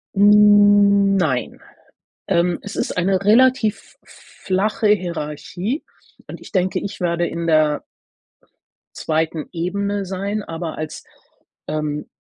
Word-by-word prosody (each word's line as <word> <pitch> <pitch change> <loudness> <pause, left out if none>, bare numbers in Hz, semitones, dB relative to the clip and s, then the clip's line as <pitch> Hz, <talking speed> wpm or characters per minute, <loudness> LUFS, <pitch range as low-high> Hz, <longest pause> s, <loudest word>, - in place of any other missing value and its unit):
Hm, 205 -1 +5
nein. 150 -10 -1 0.7
Ähm, 175 0 +1
es 205 - -8
ist - - -3
eine 190 +1 0
relativ 240 0 +2
flache 210 +3 -3
Hierarchie 180 - -2 0.4
und - - -10
ich - - -14
denke, 185 -1 0
ich 200 - -7
werde 175 -1 0
in 170 0 -4
der 155 -2 +2 1.1
2. 160 0 -2
Ebene 200 +3 -2
sein, 200 +3 -4
aber 165 0 -6
als, 155 0 -6 0.6
ähm, 150 -1 -3
185 Hz, 110 wpm, -20 LUFS, 165-205 Hz, 1.1 s, Hm